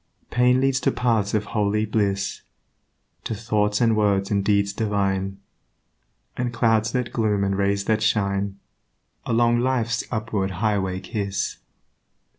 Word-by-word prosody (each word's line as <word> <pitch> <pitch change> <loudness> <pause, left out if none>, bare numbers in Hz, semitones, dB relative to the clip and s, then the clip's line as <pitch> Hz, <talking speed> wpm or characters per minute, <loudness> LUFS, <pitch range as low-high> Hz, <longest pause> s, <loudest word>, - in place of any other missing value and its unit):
Pain 125 +1 +4
leads 135 0 +2
to 135 - +1
paths 110 -5 0
of 105 0 0
holy 105 0 0
bliss, 100 -2 -1 0.8
To 110 - -2
thoughts 105 -1 0
and 115 -2 +3
words 100 -2 +1
and 100 -1 +1
deeds 100 0 +2
divine, 95 -2 -1 1.0
And 125 -1 -2
clouds 115 -2 +2
that 125 -2 -2
gloom 105 -3 +1
and 100 0 0
rays 100 0 0
that 110 -1 +1
shine, 100 -2 0 0.7
Along 120 +1 +3
life's 120 -2 0
upward 110 -4 -2
highway 95 -3 0
kiss. 100 0 -3
105 Hz, 130 wpm, -23 LUFS, 100-115 Hz, 1.0 s, Pain